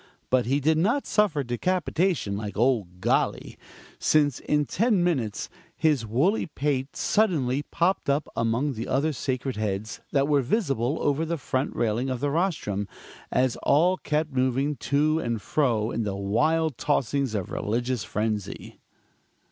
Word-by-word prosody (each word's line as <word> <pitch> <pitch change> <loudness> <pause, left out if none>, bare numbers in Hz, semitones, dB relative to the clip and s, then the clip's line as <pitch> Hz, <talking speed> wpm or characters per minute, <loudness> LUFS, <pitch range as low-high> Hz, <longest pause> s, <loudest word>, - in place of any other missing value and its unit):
But 125 -2 +3
he 135 +3 +2
did 155 +2 +2
not 235 - +1
suffer 200 -9 +2
decapitation, 170 - 0
like 105 0 -5
"ole 120 -4 +2
Golly": - - 0 0.4
since 145 -4 +2
in 150 0 +1
ten 210 - +2
minutes, 130 -12 -1 0.3
his 150 -8 +2
woolly 150 - +1
pate 145 -2 -2
suddenly 150 - +1
popped 180 -2 0
up 140 +2 +1
among 115 +5 0
the 115 -1 -5
other 150 +4 +1
sacred 130 -2 -3
heads 105 0 -3
that 140 -1 +2
were 145 -2 +3
visible 140 - 0
over 145 +2 +1
the 165 +1 -2
front 130 -1 -2
railing 120 +3 0
of 130 -2 -2
the 145 +2 0
rostrum, 145 - -1 0.4
as 130 -2 +1
all 175 +6 +3
kept 150 -1 -1
moving 130 +3 +1
to 155 +3 +1
and 115 -7 -2
fro 115 -2 0
in 115 - -2
the 100 -3 -2
wild 150 +9 +1
tossings 140 -3 0
of 95 -4 -3
religious 120 +2 -1
frenzy. 105 -1 -3
135 Hz, 150 wpm, -26 LUFS, 115-155 Hz, 0.4 s, But